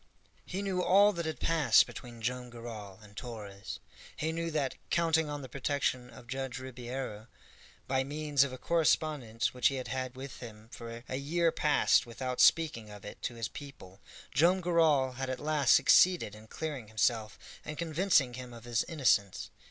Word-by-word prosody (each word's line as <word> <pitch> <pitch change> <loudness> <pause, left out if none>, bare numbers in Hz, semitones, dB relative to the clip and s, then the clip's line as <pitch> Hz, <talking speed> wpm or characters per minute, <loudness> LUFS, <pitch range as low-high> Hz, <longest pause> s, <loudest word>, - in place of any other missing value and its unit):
He 190 +2 -3
knew 190 -2 -1
all 200 +3 +5
that 170 -2 -3
had 160 - -4
passed 165 -3 +4
between 120 -2 -10
Joam 125 +1 -2
Garral 115 -5 -8
and 105 -1 -16
Torres. 105 -5 -7 0.4
He 160 +3 -1
knew 165 +1 -2
that, 150 -4 -1 0.2
counting 160 -2 +2
on 145 -1 -5
the - - -7
protection 130 -1 -1
of 125 0 -13
Judge 130 0 -4
Ribeiro, 125 -3 -6 0.6
by 130 0 +1
means 145 0 +1
of 140 - -3
a 130 - -7
correspondence 150 -8 +1
which 125 -1 +3
he 135 - 0
had 130 -3 -5
had 130 +1 -3
with 135 +1 -8
him 110 -2 -11
for 115 -1 -9
a 130 - -3
year 165 +4 +1
past 150 -5 +3
without 125 +2 -2
speaking 150 -10 +3
of 105 -1 -11
it 105 - -9
to 120 - -4
his 115 -1 -3
people, 100 -11 -11 0.3
Joam 170 +8 +4
Garral 155 -8 +2
had 135 0 -3
at 130 - -3
last 145 -4 +3
succeeded 180 - +5
in 110 +1 -13
clearing 145 -4 -5
himself 110 0 0 0.3
and 155 -1 -6
convincing 160 -5 +2
him 125 0 -8
of 115 -1 -11
his 120 -1 0
innocence. 125 - +1
130 Hz, 175 wpm, -31 LUFS, 120-155 Hz, 0.6 s, all